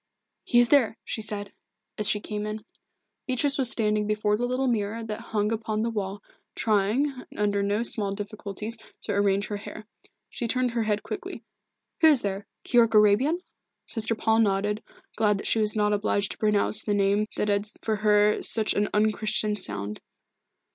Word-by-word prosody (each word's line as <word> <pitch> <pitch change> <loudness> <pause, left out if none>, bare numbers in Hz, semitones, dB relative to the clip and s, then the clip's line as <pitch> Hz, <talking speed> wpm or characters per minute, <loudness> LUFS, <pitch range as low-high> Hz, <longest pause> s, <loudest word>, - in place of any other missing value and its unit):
"He 240 - +2
is 240 -1 +6
there!" 255 -6 +4
she 220 - -2
said, 205 -2 -3 0.4
as 210 - +1
she 210 - +3
came 210 0 -4
in. 215 0 -6 0.6
Beatrice 275 +2 +2
was 260 -3 +4
standing 210 -2 +1
before 210 0 +1
the 245 +3 -1
little 255 +2 -1
mirror 225 -2 -1
that 215 -1 -5
hung 210 -1 0
upon 220 -1 -2
the 230 - -1
wall, 205 -2 -4 0.3
trying, 230 +6 0
under 205 -1 +1
no 205 +3 0
small 210 -4 +1
difficulties, 210 +1 -5 0.3
to - - -2
arrange 200 0 +1
her 205 - -3
hair. 215 +1 -9 0.5
He 235 - -3
turned 250 +1 0
her 235 0 -1
head 210 -1 0
quickly. - - -6 0.6
"Who 320 - +6
is 290 -5 +5
there? 200 0 -3 0.2
Keyork 230 -3 +3
Arabian?" 215 - +4 0.4
Sister 225 -1 -1
Paul 220 0 +2
nodded, 210 0 +1 0.4
glad 210 -2 +3
that - - -7
she 225 - +3
was 215 0 +1
not 210 -1 +2
obliged 205 -1 0
to - - -7
pronounce 210 0 +2
the 205 - -1
name 200 +1 +2
that - - 0
had 205 +1 +1 0.2
for 220 -1 0
her 210 0 +3
such 220 -2 +2
an 205 0 0
unChristian 215 0 +1
sound. 105 - -4
210 Hz, 175 wpm, -26 LUFS, 205-225 Hz, 0.6 s, is